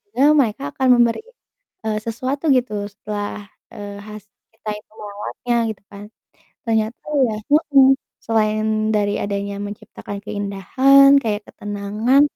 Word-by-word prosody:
Mereka 265 - +3
akan 260 - +1
memberi, 235 - +2 0.6
eee, 215 -1 0
sesuatu 260 +7 -2
gitu 215 -5 0
setelah, 205 0 -6 0.3
eee, 205 0 -8
hasil 210 0 -11 0.2
kita 220 -1 -8
itu 210 - -26
merawatnya 210 +4 -4 0.2
gitu 215 - -11
kan, 200 0 -10 0.6
ternyata 220 0 -1 0.2
ya 220 - -2 0.2
mhm, 280 -3 +5 0.3
selain 215 -1 0 0.3
dari 205 -1 +1
adanya 200 0 -3
menciptakan 205 0 -8
keindahan 260 +8 +4
kayak 210 -2 -2
ketenangan 210 +6 +1
215 Hz, 115 wpm, -20 LUFS, 205-250 Hz, 0.6 s, mhm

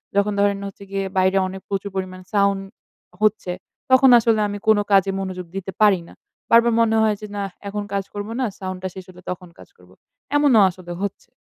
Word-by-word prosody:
যখন 200 +1 +2
ধরেন 200 0 +2
হচ্ছে 200 0 -11
গিয়ে 195 0 -1
বাইরে 190 +1 +3
অনেক 190 +1 -7
প্রচুর 200 0 -2
পরিমাণ 185 -1 -4
সাউন্ড 200 -1 +2 0.6
হচ্ছে, 215 -4 +1 0.4
তখন 260 +1 +7
আসলে 225 -1 +2
আমি 205 0 -4
কোন 220 -1 +6
কাজে 195 -1 +4
মনোযোগ 185 -2 -5
দিতে 195 0 -4
পারি 205 -3 +5
না। - - -14 0.4
বারবার 235 0 +6
মনে 225 -1 +3
হয় 215 -1 +2
যে 210 - -6
না 200 - -1 0.2
এখন 205 +1 -3
কাজ 200 -1 0
করব 205 0 -5
না, - - +2
সাউন্ড 185 -1 -5
টা - - -1
শেষ 190 -1 -8
হলে 180 -1 -14
তখন 180 -1 -7
কাজ - - -14
করব। 90 0 -21 0.4
এমনও 290 -6 +5
আসলে 180 -1 -10
হচ্ছে। 200 -1 -5
200 Hz, 200 wpm, -22 LUFS, 185-210 Hz, 0.6 s, তখন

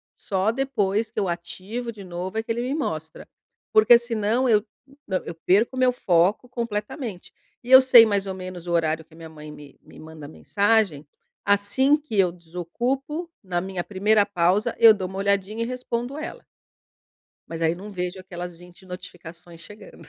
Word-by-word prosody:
Só 195 +2 -1
depois 225 -5 -1
que 220 - -4
eu 200 - 0
ativo 190 +7 -5
de 210 -3 -11
novo 180 +3 -6
é 225 - -1
que 230 - -4
ele 235 +1 -1
me 255 +3 -2
mostra. 160 - -5 0.5
Porque 220 +2 +7
senão 235 +1 0
eu 210 -2 +4 0.4
na 190 -2 0
eu - - -5
perco 200 +9 +2
o - - -3
meu 255 -1 +4
foco 190 0 +1
completamente. 220 - -5 0.3
E 245 - -7
eu 260 - +11
sei 245 -3 +8
mais 200 -2 -1
ou 190 - -3
menos 185 -2 -8
o - - -3
horário 160 -1 0
que 160 - -20
minha 165 0 -11
mãe 150 -1 -11
me 145 -1 -14
me - - -17
manda 155 -2 -11
mensagem, 200 -2 0 0.4
assim 205 +8 +3
que 290 -9 -6
eu 180 -3 +4
desocupo, 240 - -4
na 175 -2 -2
minha 190 -1 -4
primeira 205 +2 +2
pausa, 190 +1 +1
eu 225 -2 +9
dou 190 -3 -4
uma 190 +1 -7
olhadinha 200 +3 0
e - - -2
respondo 250 +1 -4
ela. 310 - -7 1.1
Mas 165 0 -6
aí 165 +1 +2
não 200 +4 -10
vejo 180 0 -4
aquelas 180 -2 -8
20 180 +2 -17
notificações 175 -2 -11
chegando. 210 +4 -13
195 Hz, 180 wpm, -24 LUFS, 175-230 Hz, 1.1 s, eu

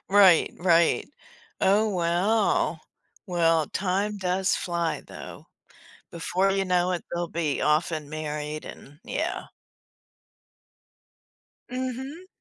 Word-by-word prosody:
Right, 190 -4 +6
right. 170 -1 +3 0.5
Oh, 205 +3 +4
wow. 180 -1 +1 0.5
Well, 165 -3 +2
time 200 +3 -1
does 185 0 +1
fly 170 -2 -2
though. - - -10 0.6
Before 185 +3 0
you 195 0 +1
know 180 0 +2
it, 175 - -3
they'll 175 -1 -2
be 160 -4 -1
off 155 +3 +2
and 155 -2 -4
married 150 0 -4
and 145 +2 -11
yeah. - - -3 2.2
Mhm. 260 +7 -5
175 Hz, 100 wpm, -26 LUFS, 165-195 Hz, 2.2 s, Right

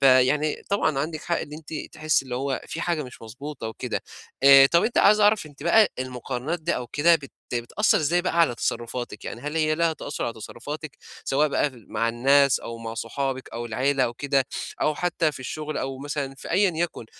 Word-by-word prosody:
فيعني 135 +3 +4
طبعًا 160 -8 +1
عندِك 155 +2 -3
حق 170 - 0
إن 150 - -7
أنتِ 155 +1 -8 0.2
تحسّي 155 -2 +1
اللي 125 -2 -5
هو 135 +1 -2
في 165 - -5
حاجة 170 -3 0
مش 125 -4 -11
مضبوطة 125 +2 -7
وكده. 110 - -4 0.4
آآ 135 0 +9
طَب 170 +4 +3
أنتِ 235 - +1
عايز 210 +1 +6
اعرف 210 -4 +4
أنتِ 145 -1 -13
بقى 210 +6 +5
المقارنات 130 +5 -4
دي 165 +2 0
أو 125 - -4
كده 160 +7 +4
بت 140 -4 -5 0.2
بتأثّر 120 - +2
إزاي 170 +3 +1
بقى 170 -1 +1
على 160 -8 +4
تصرّفاتِك؟ 120 +1 -4
يعني 115 - -6
هل 150 +4 -4
هي 155 -1 +2
ليها 165 0 +2
تأثّر 155 - -5
على 115 - -2
تصرّفاتِك، 140 +7 -8 0.3
سواء 150 +3 +2
بقى 145 +1 +1
في 130 - -17
ال 115 -3 -17
مع 115 +1 +1
الناس 135 +3 +4
أو 115 0 -7
مع 115 -1 -6
صحابِك 130 +3 -3
أو 120 +1 -4
العيلة 130 +4 +1
أو 120 - -3
كده 140 +1 +1 0.4
أو 155 - +2
حتى 165 -2 0
في 135 - -9
الشغل 155 +4 -4
أو 135 0 -4
مثلًا 140 -1 -4
في - - -8
أيّا 190 +2 +4
يكن، 165 -8 -2
140 Hz, 210 wpm, -25 LUFS, 125-160 Hz, 0.4 s, آآ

